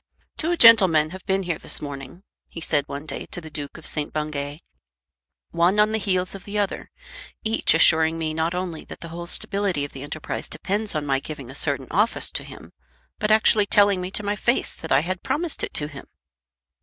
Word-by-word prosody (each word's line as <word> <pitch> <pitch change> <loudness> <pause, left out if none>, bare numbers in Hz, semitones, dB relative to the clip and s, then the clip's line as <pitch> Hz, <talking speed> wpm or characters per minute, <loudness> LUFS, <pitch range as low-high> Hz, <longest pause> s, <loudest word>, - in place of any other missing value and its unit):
"Two 345 +2 -1
gentlemen 190 - +7
have 190 +1 -9
been 195 0 +1
here 170 -3 -3
this - - -1
morning," 140 +4 -8 0.3
he - - -8
said 145 -3 +1
one 140 +2 -6
day 145 - -5
to - - -5
the 160 -2 -11
Duke 145 0 -6
of 160 - -13
St. 150 -2 -1
Bungay, 150 -1 -4 0.9
"one 175 +5 +2
on 210 +1 +4
the 220 - 0
heels 185 -3 0
of 195 -1 -9
the 210 +1 -5
other, 205 -2 -2 0.5
each 220 -6 +3
assuring 160 0 +4
me 160 -1 -2
not 160 +2 -1
only 180 -3 -4
that - - -11
the 170 - -7
whole 170 +1 -7
stability 195 -6 0
of 145 - -10
the 135 - -9
enterprise 145 +2 -5
depends 205 0 -2
on 150 -1 -1
my 135 -1 +1
giving 140 -3 -8
a - - -10
certain 140 -1 -1
office 210 +5 +1
to - - -2
him, - - -12 0.5
but 210 - 0
actually 215 -1 +5
telling 200 -2 +4
me 180 - -4
to 210 - -2
my 205 +1 -1
face 240 +4 0
that 160 - -9
I 135 - +5
had 180 +3 -3
promised 330 +1 -1
it - - -4
to 145 - +2
him!" 145 -3 -11
170 Hz, 210 wpm, -23 LUFS, 150-200 Hz, 0.9 s, gentlemen